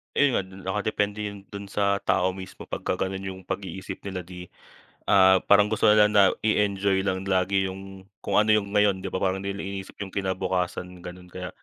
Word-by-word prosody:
Ayun, 95 Hz, -9 st, +1 dB
nakadepende 105 Hz, +1 st, -1 dB
yun 100 Hz, -1 st, -9 dB
do'n 100 Hz, 0 st, -7 dB
sa 100 Hz, 0 st, +1 dB
tao 95 Hz, +1 st, +1 dB
mismo 95 Hz, 0 st, -9 dB
pagka -, -, -2 dB
gano'n 95 Hz, 0 st, -3 dB
yung 95 Hz, -, -11 dB
pag-iisip 95 Hz, 0 st, -6 dB
nila 95 Hz, -2 st, -4 dB
di, 90 Hz, 0 st, -10 dB, 0.6 s
ah, 95 Hz, -1 st, +6 dB
parang 100 Hz, +1 st, +5 dB
gusto 110 Hz, -, +3 dB
nila 105 Hz, 0 st, +6 dB
na 105 Hz, -1 st, +5 dB, 0.2 s
i-enjoy 100 Hz, -2 st, +2 dB
lang 95 Hz, -1 st, -2 dB
lagi 95 Hz, 0 st, +1 dB
yung 95 Hz, 0 st, -9 dB, 0.2 s
kung -, -, 0 dB
ano 110 Hz, 0 st, +4 dB
yung 100 Hz, -2 st, -1 dB
ngayon 100 Hz, -2 st, +2 dB
di -, -, -3 dB
ba, -, -, -1 dB
parang 95 Hz, 0 st, 0 dB
di 100 Hz, -, -2 dB
nila 100 Hz, -, -6 dB
iniisip 95 Hz, -1 st, -7 dB
yung 95 Hz, -2 st, -6 dB
kinabukasan 90 Hz, -2 st, -2 dB
gano'n 90 Hz, +1 st, -9 dB
kaya 90 Hz, 0 st, -6 dB
95 Hz, 185 wpm, -25 LUFS, 95-100 Hz, 0.6 s, ah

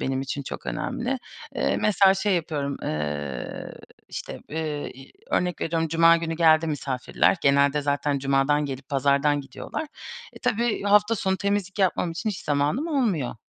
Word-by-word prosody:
benim 130 Hz, 0 st, -1 dB
için 140 Hz, +1 st, -4 dB
çok -, -, -7 dB
önemli. 245 Hz, -, -2 dB, 0.4 s
Eee, -, -, +1 dB
mesela 195 Hz, -2 st, +4 dB
şey 195 Hz, 0 st, +1 dB
yapıyorum, 145 Hz, -4 st, -2 dB
ııı, 75 Hz, -4 st, -4 dB, 0.4 s
işte, -, -, -7 dB
eee, 155 Hz, -1 st, -3 dB
i 135 Hz, -, -14 dB, 0.2 s
örnek 180 Hz, 0 st, 0 dB
veriyorum 165 Hz, 0 st, 0 dB
cuma 165 Hz, +1 st, +6 dB
günü 165 Hz, -1 st, -3 dB
geldi 160 Hz, -1 st, +5 dB
misafirler, 140 Hz, +2 st, 0 dB
genelde 140 Hz, +1 st, +4 dB
zaten 145 Hz, 0 st, 0 dB
cumadan 140 Hz, +2 st, +2 dB
gelip 135 Hz, 0 st, -6 dB
pazardan 140 Hz, +1 st, +2 dB
gidiyorlar. 135 Hz, -, -6 dB, 0.5 s
Eee, -, -, -12 dB
tabii 235 Hz, 0 st, 0 dB
hafta 210 Hz, +2 st, +4 dB
sonu 190 Hz, -2 st, 0 dB
temizlik 200 Hz, 0 st, -1 dB
yapmam 180 Hz, -2 st, +1 dB
için 175 Hz, +7 st, -3 dB
hiç 190 Hz, -, -6 dB
zamanım 150 Hz, -, 0 dB
olmuyor. 220 Hz, -, 0 dB
155 Hz, 150 wpm, -25 LUFS, 140-190 Hz, 0.5 s, cuma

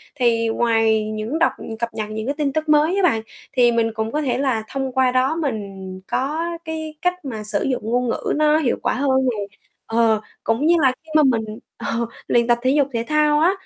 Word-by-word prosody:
thì 235 Hz, -4 st, +2 dB
ngoài 225 Hz, -1 st, +2 dB
những 215 Hz, +9 st, -3 dB
đọc, 330 Hz, -, +4 dB, 0.3 s
cập 235 Hz, 0 st, -3 dB
nhật 215 Hz, -1 st, -4 dB
những 215 Hz, 0 st, -4 dB
cái 280 Hz, +3 st, -2 dB
tin 285 Hz, -2 st, 0 dB
tức 310 Hz, 0 st, -2 dB
mới 305 Hz, +4 st, +4 dB
á 395 Hz, -, +1 dB
bạn, 225 Hz, -11 st, +3 dB, 0.3 s
thì 245 Hz, -2 st, +4 dB
mình 230 Hz, -1 st, +1 dB
cũng 220 Hz, 0 st, -3 dB
có 300 Hz, -, -1 dB
thể 250 Hz, -4 st, 0 dB
là 260 Hz, -5 st, 0 dB
thông 270 Hz, -1 st, -3 dB
qua 260 Hz, 0 st, +2 dB
đó 255 Hz, +5 st, +2 dB
mình 200 Hz, -, -4 dB
có 295 Hz, +5 st, -1 dB, 0.2 s
cái 315 Hz, -1 st, -5 dB
cách 360 Hz, -2 st, -1 dB
mà 225 Hz, -5 st, -5 dB
sử 210 Hz, -1 st, -2 dB
dụng 260 Hz, -2 st, -1 dB
ngôn 245 Hz, +1 st, +1 dB
ngữ -, -, -1 dB
nó 305 Hz, 0 st, +4 dB
hiệu 295 Hz, -6 st, +1 dB
quả -, -, 0 dB
hơn 265 Hz, -1 st, +2 dB
nè. 245 Hz, -4 st, 0 dB, 0.5 s
Ờ, 225 Hz, -1 st, +2 dB, 0.2 s
cũng 225 Hz, +6 st, 0 dB
như 345 Hz, -, +5 dB
là 265 Hz, -3 st, +5 dB
khi 320 Hz, -, -20 dB
mà 310 Hz, -, +6 dB
mình, 225 Hz, -3 st, 0 dB, 0.2 s
ờ, -, -, -8 dB, 0.4 s
luyện 235 Hz, -1 st, +2 dB
tập 240 Hz, -1 st, +4 dB
thể 260 Hz, +1 st, +2 dB
dục 285 Hz, -1 st, +3 dB
thể 230 Hz, -1 st, -1 dB
thao 300 Hz, -1 st, +3 dB
á 335 Hz, +4 st, +4 dB
255 Hz, 225 wpm, -21 LUFS, 225-300 Hz, 0.5 s, mà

